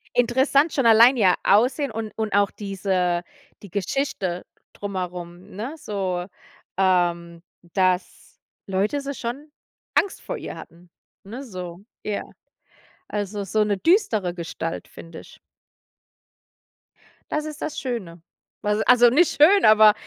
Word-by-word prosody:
Interessant 265 Hz, +5 st, +3 dB
schon 270 Hz, -6 st, 0 dB
allein 230 Hz, +3 st, +7 dB
ihr 190 Hz, -5 st, +5 dB
Aussehen 255 Hz, +7 st, +3 dB
und 220 Hz, -1 st, -5 dB
und 220 Hz, -2 st, -2 dB
auch 200 Hz, -1 st, +3 dB
diese 190 Hz, -3 st, -1 dB, 0.4 s
die 200 Hz, -, -12 dB
Geschichte 190 Hz, -3 st, -2 dB, 0.3 s
drumherum, 180 Hz, -3 st, -6 dB
ne? 230 Hz, +9 st, -5 dB
So, 185 Hz, -, -3 dB, 0.5 s
ähm, 175 Hz, -3 st, +1 dB, 0.3 s
dass 185 Hz, -1 st, -1 dB, 0.3 s
Leute 200 Hz, +9 st, 0 dB
so 280 Hz, 0 st, -5 dB
schon 275 Hz, +5 st, -6 dB, 0.4 s
Angst 400 Hz, -, +1 dB
vor -, -, -5 dB
ihr -, -, -7 dB
hatten, 170 Hz, +1 st, -14 dB, 0.3 s
ne, 235 Hz, +7 st, -8 dB
so, 180 Hz, -7 st, -8 dB, 0.2 s
ja. 210 Hz, -1 st, -2 dB, 0.9 s
Also, 205 Hz, 0 st, -3 dB
so 215 Hz, +3 st, +1 dB
'ne 205 Hz, -1 st, 0 dB
düstere 220 Hz, -, +2 dB
Gestalt, 165 Hz, -1 st, -5 dB
finde 165 Hz, -1 st, -11 dB
ich. -, -, -15 dB, 1.9 s
Das 300 Hz, 0 st, -1 dB
ist 305 Hz, -1 st, -8 dB
das 310 Hz, -, -4 dB
Schöne. 195 Hz, -10 st, -5 dB, 0.4 s
Also 210 Hz, +1 st, 0 dB
also 245 Hz, -1 st, +6 dB
nicht 310 Hz, +8 st, +3 dB
schön, 390 Hz, +6 st, +7 dB
aber 215 Hz, 0 st, +7 dB
205 Hz, 125 wpm, -23 LUFS, 180-250 Hz, 1.9 s, allein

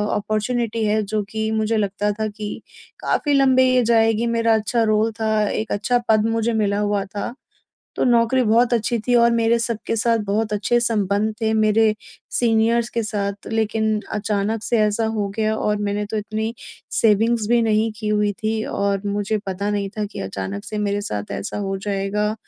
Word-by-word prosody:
Opportunity 220 Hz, +2 st, -1 dB
है 215 Hz, +1 st, +2 dB
जो 215 Hz, +1 st, -1 dB
कि 220 Hz, +1 st, -2 dB
मुझे 220 Hz, 0 st, 0 dB
लगता 205 Hz, 0 st, 0 dB
था 220 Hz, -, 0 dB
कि 210 Hz, 0 st, -6 dB, 0.5 s
काफ़ी 290 Hz, -, 0 dB
लंबे 265 Hz, -2 st, +5 dB
ये 255 Hz, -1 st, +3 dB
जाएगी 225 Hz, 0 st, +3 dB
मेरा 230 Hz, -1 st, +2 dB
अच्छा 225 Hz, +2 st, 0 dB
रोल 215 Hz, +1 st, +2 dB
था 215 Hz, -1 st, +1 dB
एक 220 Hz, -, -3 dB
अच्छा 245 Hz, +5 st, +1 dB
पद 215 Hz, -1 st, +4 dB
मुझे 225 Hz, +1 st, 0 dB
मिला 205 Hz, -2 st, +1 dB
हुआ 205 Hz, -1 st, 0 dB
था। 205 Hz, +3 st, -5 dB, 0.6 s
तो -, -, +1 dB
नौकरी 240 Hz, +1 st, +3 dB
बहुत 235 Hz, +2 st, +3 dB
अच्छी 235 Hz, +1 st, 0 dB
थी 245 Hz, -, +2 dB
और 235 Hz, 0 st, +5 dB
मेरे 230 Hz, 0 st, +2 dB
सबके 230 Hz, -1 st, -2 dB
साथ 230 Hz, +1 st, +2 dB
बहुत 215 Hz, +1 st, 0 dB
अच्छे 210 Hz, +4 st, +1 dB
संबंध 215 Hz, -2 st, 0 dB
थे 220 Hz, 0 st, +1 dB
मेरे 215 Hz, 0 st, +3 dB, 0.4 s
सीनियर्स 230 Hz, 0 st, +2 dB
के 230 Hz, -, -1 dB
साथ 200 Hz, -2 st, -3 dB
लेकिन 220 Hz, -1 st, 0 dB
अचानक 210 Hz, +1 st, -1 dB
से 235 Hz, -, +1 dB
ऐसा 215 Hz, +1 st, +1 dB
हो 200 Hz, -, 0 dB
गया 220 Hz, -1 st, +1 dB
और 210 Hz, -1 st, 0 dB
मैंने 205 Hz, +1 st, -1 dB
तो 220 Hz, -, -4 dB
इतनी 220 Hz, +2 st, -3 dB, 0.4 s
सेविंग्स 225 Hz, +1 st, +2 dB
भी 240 Hz, 0 st, +4 dB
नहीं 220 Hz, 0 st, +2 dB
की 215 Hz, -1 st, -3 dB
हुई 210 Hz, -1 st, +1 dB
थी 220 Hz, 0 st, 0 dB
और 200 Hz, -1 st, -1 dB
मुझे 205 Hz, +1 st, -1 dB
पता 195 Hz, +2 st, -2 dB
नहीं 200 Hz, -1 st, -1 dB
था 210 Hz, -, 0 dB
कि -, -, -6 dB
अचानक 95 Hz, +1 st, -5 dB
से 215 Hz, -, -5 dB
मेरे 205 Hz, -1 st, 0 dB
साथ 105 Hz, -, -5 dB
ऐसा 100 Hz, 0 st, -4 dB
हो 195 Hz, -1 st, -2 dB
जाएगा। 205 Hz, +2 st, -1 dB
215 Hz, 185 wpm, -21 LUFS, 205-225 Hz, 0.6 s, लंबे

